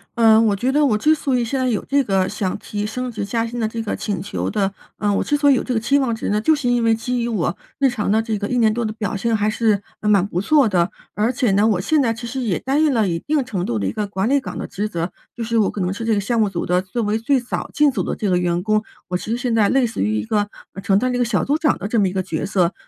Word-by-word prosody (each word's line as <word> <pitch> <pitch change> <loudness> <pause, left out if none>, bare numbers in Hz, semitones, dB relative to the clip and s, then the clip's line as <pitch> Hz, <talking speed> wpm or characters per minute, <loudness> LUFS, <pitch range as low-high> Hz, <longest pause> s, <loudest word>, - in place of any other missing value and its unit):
呃， 225 -2 +6
我 215 -3 +3
觉 245 +6 0
得 295 +2 +3
我 220 -6 +2
之 305 +8 +3
所 275 -4 0
以 240 - +1
现 265 +4 -2
在 260 - +1
有 225 -5 0
这 280 +1 +2
个 190 -3 +1
想 195 -2 -2
提 205 0 -4
升 250 +3 -4
职 215 -3 -4
加 230 +3 -1
薪 240 +1 -5
的 220 - +1
这 225 +1 -4
个 215 - -3
请 200 -4 -3
求 200 - -3
的 195 -2 0 0.2
呃， 205 -1 0
我 - - +1
之 295 - 0
所 285 -1 +4
以 - - +6
有 255 - +1
这 255 - -2
个 225 - +1
期 275 +6 +2
望 250 -4 0
值 225 - -4
呢？ 210 - +1
就 315 +9 +3
是 275 -4 -1
因 245 -1 +2
为 225 0 +4
基 245 +2 -2
于 235 - -1
我 190 -7 -1 0.2
日 275 -1 +3
常 215 -5 -2
的 220 +2 +3
这 220 -2 -2
个 200 - -3
一 250 - -1
年 220 -2 +3
多 235 +1 -1
的 215 - -3
表 220 0 -3
现 225 +3 0
还 210 0 +1
是， 215 -2 +1 0.2
嗯， 210 - -1
蛮 200 -3 +4
不 180 -3 -3
错 265 +5 +3
的。 175 -2 +2 0.3
而 220 +4 +1
且 250 -4 +1
呢， 200 +3 +3
我 195 -5 +1
现 310 +8 +2
在 230 -4 +1
其 230 +1 -8
实 250 +3 -4
也 215 -8 0
担 275 +4 0
任 305 -3 +3
了 220 -4 +2
一 165 -2 -1
定 295 - 0
程 200 -8 -3
度 115 - -1
的 100 - -2
一 95 - 0
个 205 - -3
管 195 +2 -1
理 280 +1 +3
岗 265 - -7
的 - - -4
职 205 +5 -3
责。 170 -3 -3 0.2
就 235 - -4
是 230 +1 -1
我 215 - +3
可 200 - -4
能 180 +1 0
是 225 +3 -5
这 225 - +2
个 205 - +2
项 230 +3 0
目 215 - +3
组 175 -3 -3
的 180 +1 +2
作 225 +5 -3
为 210 +1 0
最 265 +4 +2
早 245 - -4
进 295 -1 +4
组 - - -2
的 - - -3
这 210 - -2
个 180 - +3
员 175 0 0
工， 215 +1 +2 0.3
我 180 - 0
其 200 - -8
实 235 - 0
现 245 -2 -1
在 220 -3 +4
类 265 -2 +3
似 230 - -3
于 105 +2 +1
一 105 - -2
个 205 - 0 0.2
呃， 195 - -7
承 195 0 +2
担 255 +5 +1
了 - - -1
一 - - -1
个 245 - +2
小 215 -5 0
组 290 +2 +1
长 310 -1 +1
的 200 - -4
这 225 +1 +1
么 200 - +3
一 185 - -4
个 190 -1 -1
角 165 -4 -3
色。 185 -2 +1
220 Hz, 355 characters per minute, -20 LUFS, 200-245 Hz, 0.3 s, 呃